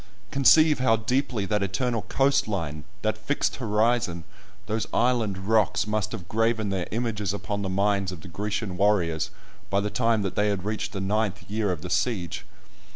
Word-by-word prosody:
Conceive 150 +2 +5
how 125 -3 +4
deeply 115 -1 -1
that 105 +1 0
eternal 115 +4 0
coast 140 +2 +2
line, 80 -8 -3 0.2
that 110 0 0
fixed 140 +6 -1
horizon, 110 -6 +1 0.4
those 110 +1 -2
island 115 -5 +1
rocks, 110 -2 +3
must 105 0 -1
have 95 -7 -6
graven 110 0 +1
their 95 -3 -2
images 105 -4 -1
upon 100 0 -3
the 95 - -2
minds 100 0 +1
of 90 -4 -8
the - - -10
Grecian 100 0 -3
warriors 90 -6 +2 0.4
by 100 - +2
the 105 +1 -2
time 115 -3 +2
that 95 - -3
they 105 - +2
had 100 -2 -2
reached 105 0 -3
the 100 - -3
ninth 100 0 0
year 105 -1 0
of 85 -3 -4
the 90 - -5
siege! 100 -4 -1
105 Hz, 175 wpm, -26 LUFS, 95-115 Hz, 0.4 s, Conceive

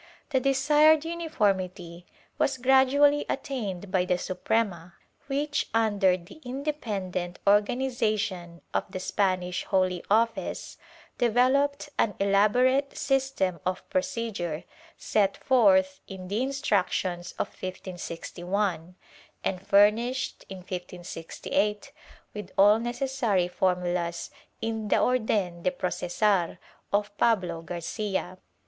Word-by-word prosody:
The 265 - +3
desired 295 +4 +4
uniformity 190 - -2 0.3
was 270 - +1
gradually 270 +3 +4
attained 210 -10 -4
by 185 -2 +2
the 180 -1 +1
Suprema 180 -2 -2 0.3
which, 290 +1 -1
under 205 -5 +3
the 175 - -15
independent 210 - -3
organization 210 -5 +1
of - - 0
the 185 - -5
Spanish 185 -1 0
Holy 185 -2 +1
Office, 225 +2 0 0.4
developed 265 +5 +2
an 210 - +2
elaborate 245 +8 +3
system 265 - 0
of 185 0 -3
procedure, 230 - -2 0.3
set 200 -2 +1
forth 190 -7 +3
in 185 -2 -8
the 210 +4 0
Instructions 195 -9 -1
of - - -3
1561 180 0 -4 0.5
and 190 0 -3
furnished, 225 +6 +3
in 190 - -7
1568, 180 - -3 0.4
with 210 -1 -7
all 205 +3 +6
necessary 240 -6 0
formulas 180 -2 -1 0.3
in 225 -1 -2
the - - +3
Or 255 0 +3
den 190 -6 -1
de - - +2
Processor 180 -5 0 0.3
of 205 0 0
Pablo 180 -8 +1
Garcia. 180 +2 -4
205 Hz, 105 wpm, -27 LUFS, 180-255 Hz, 0.5 s, all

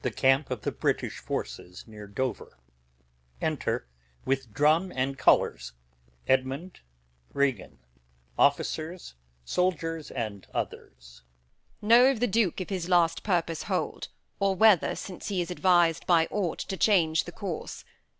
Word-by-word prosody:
Scene 135 +2 +2
I. 125 - -1
The 105 - -4
British - - -2
camp - - -4 0.3
near 105 -2 -11
Dover. 115 +3 -4 0.8
Enter, - - -2 0.4
with 135 -4 -1
Drum 155 - +2
and 130 +1 -1
Colours, - - +2 0.5
Edmund, 135 +7 -1 0.5
Regan, 135 - -1 0.6
Gentleman, 140 - +4 0.3
and 180 - -12 0.3
Soldiers. 165 - -1
Edm. 80 - -6 0.6
Know 235 +4 +7
of 270 -5 -1
the 245 - +2
Duke 215 -5 +1
if 185 - -5
his 180 -2 -3
last 170 -2 +3
purpose 170 -5 -1
hold, - - -3 0.3
Or 195 -1 +1
whether 210 -3 +4
since 185 -3 -8
he 195 -3 -1
is 175 0 -2
advis'd 175 -3 +2
by 165 -2 +4
aught 190 -6 -1
To 190 - -5
change 165 -7 +3
the 175 - -8
course. 180 -3 -6
165 Hz, 130 wpm, -27 LUFS, 130-185 Hz, 0.8 s, Know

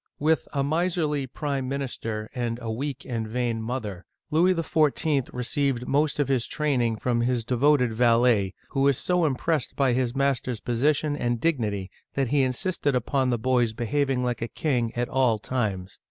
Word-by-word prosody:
With 155 +2 +1
a 140 -2 0
miserly 155 -2 0
prime 135 -1 -3
minister 115 -6 -4
and 120 -3 -2
a 115 -2 -4
weak 135 +3 -4
and 115 -3 -3
vain 115 0 -1
mother, 110 -6 -4 0.3
Louis 175 +4 +4
XIV. 155 -4 +1
received 125 0 -1
most 145 +1 +1
of 145 -3 +1
his 130 -4 0
training 130 -7 0
from 120 +1 0
his 120 -1 0
devoted 125 0 +2
valet, 115 -4 +3
who 135 - -1
was 140 -2 +4
so 180 -2 +1
impressed 150 0 -1
by 135 -3 +2
his 125 0 0
master's 135 -4 0
position 145 +6 +1
and 120 -4 -1
dignity 105 - -1 0.2
that 135 -3 0
he 145 +1 +3
insisted 135 +2 0
upon 130 +2 +1
the 120 - +1
boy's 120 -1 +1
be 120 +1 -4
having 135 0 0
like 120 -2 -2
a 115 - -1
king 120 -4 -1
at 120 0 0
all 130 -4 +2
times. 100 -5 -3
130 Hz, 170 wpm, -26 LUFS, 120-145 Hz, 0.3 s, Louis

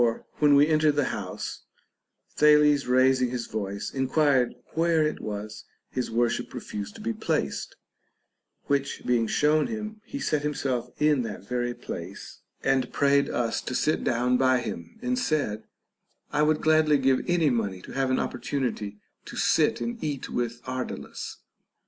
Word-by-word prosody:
When 145 -1 +6
we 145 +1 +7
entered 155 -1 +3
into - - -8
the 145 - +2
house, - - -5 0.7
Thales 150 -2 +5
raising 130 0 +4
his 120 -1 -3
voice 100 -2 -4
enquired 135 -1 +2 0.2
where 165 0 +3
it 150 - -2
was 105 0 -6 0.3
his 125 - -2
worship 115 0 0
refused 105 -1 -6
to 225 - -10
be 230 +2 -1
placed; 160 - -2 0.9
which 140 -1 -1
being 120 -2 +2
shown 150 +6 +3
him, 215 -1 -5
he 280 - -6
sat 155 - 0
himself 135 -4 -2
in 150 -3 +3
that 110 -3 -6
very 120 -1 -1
place, 85 +4 -8 0.2
and 135 -1 +1
prayed 140 0 +3
us 120 -2 -1
to 130 - -4
sit 155 - +1
down 125 +1 +2
by 130 -1 +3
him, 225 - -7
and 250 +1 0
said, 140 - -1 0.7
I 150 - +1
would 150 0 +3
gladly 155 -1 +4
give 135 -1 +2
any 170 -5 +3
money 100 -6 -1
to - - -10
have 135 -1 0
an 130 - +2
opportunity 120 -6 -3 0.3
to - - -9
sit - - +2
and 235 0 -4
eat 145 -4 -3
with 120 0 -2
Ar. 130 0 -2
dalus. - - -7
135 Hz, 160 wpm, -27 LUFS, 120-150 Hz, 0.9 s, we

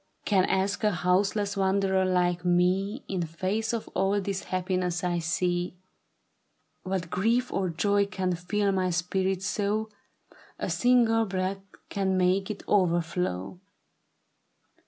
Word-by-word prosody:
Can 190 -3 +3
ask 195 +2 0
a 210 - +4
houseless 200 +2 +1
wanderer 190 -1 +2
like 180 -1 +1
me 185 +7 +1
In 190 -2 -2
face 185 +7 -2
of 230 -2 -3
all 195 +1 +1
this 195 -1 -3
happiness 180 -1 -1
I 175 -1 0
see, 175 +1 -1 1.1
AMiat 185 -3 -3
grief 235 +6 +1
or 190 -2 0
joy 200 +4 +1
can 185 -3 -1
fill 200 +4 0
my 185 -1 +1
spirit 185 +2 -1
so, 210 +2 -1 0.7
A - - -3
single 235 -2 +3
breath 190 0 -2 0.3
can 190 -1 0
make 185 +2 +2
it 210 - -5
overflow." 175 - 0
190 Hz, 125 wpm, -27 LUFS, 180-200 Hz, 1.1 s, a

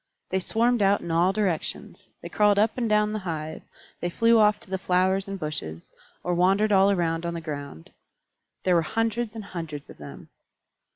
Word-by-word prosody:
They 190 - +1
swarmed 230 +4 +1
out 200 0 +3
in 170 - -5
all 170 +3 +3
directions; 195 -6 -3
they - - -5
crawled 210 -1 +3
up 215 +2 +2
and 235 -3 -1
down 210 0 +2
the 215 - -2
hive; 160 -4 -5 0.4
they 175 - -2
flew 230 +5 +3
off 210 -1 +4
to - - -17
the 190 - -1
flowers 190 +1 +1
and 195 0 -5
bushes, 85 - -6 0.3
or 180 - -1
wandered 195 +4 +3
all 195 0 +5
around 165 -4 0
on 170 0 -3
the - - -3
ground. 145 - -7 0.7
There 185 - +2
were 170 - +4
hundreds 225 +5 -2
and 220 - -6
hundreds 160 -6 -7
of - - -16
them. 70 -2 -11
190 Hz, 190 wpm, -25 LUFS, 165-210 Hz, 0.7 s, all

